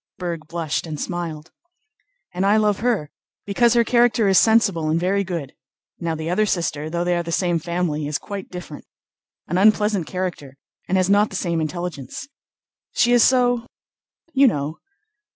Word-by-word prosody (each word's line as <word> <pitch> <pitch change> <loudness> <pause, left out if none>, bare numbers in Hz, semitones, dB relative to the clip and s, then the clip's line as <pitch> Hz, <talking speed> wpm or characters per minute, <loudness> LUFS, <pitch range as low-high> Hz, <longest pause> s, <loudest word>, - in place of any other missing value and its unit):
Berg 170 -3 -5
blushed 165 -1 -3
and 155 -2 -5
smiled. 165 -3 -5 0.8
"And 180 +2 -1
I 205 +2 +4
love 210 -2 +2
her, 215 -10 0 0.3
because 235 +4 +2
her 235 - +5
character 235 -2 +3
is 190 -1 +6
sensible 205 -8 +3
and 160 +2 +1
very 195 +3 +1
good. 170 -7 -5 0.5
Now 165 -2 -2
the 160 0 -5
other 200 +5 +1
sister, 155 -5 -1
though 170 +1 -1
they 175 0 +1
are 175 - 0
the 170 0 -6
same 175 -1 +1
family, 170 -3 -2
is 150 - -1
quite 200 -2 -7
different—an 175 0 -8
unpleasant 210 -3 +3
character 175 -7 -5 0.3
and 190 - +1
has 185 -1 +2
not 205 +2 +3
the - - -8
same 170 -3 -1
intelligence. 170 - -5 0.7
She 240 - +3
is 245 -1 +5
so... 245 -2 +3 0.7
you 275 0 +5
know?... 150 - -2
180 Hz, 165 wpm, -22 LUFS, 160-210 Hz, 0.8 s, is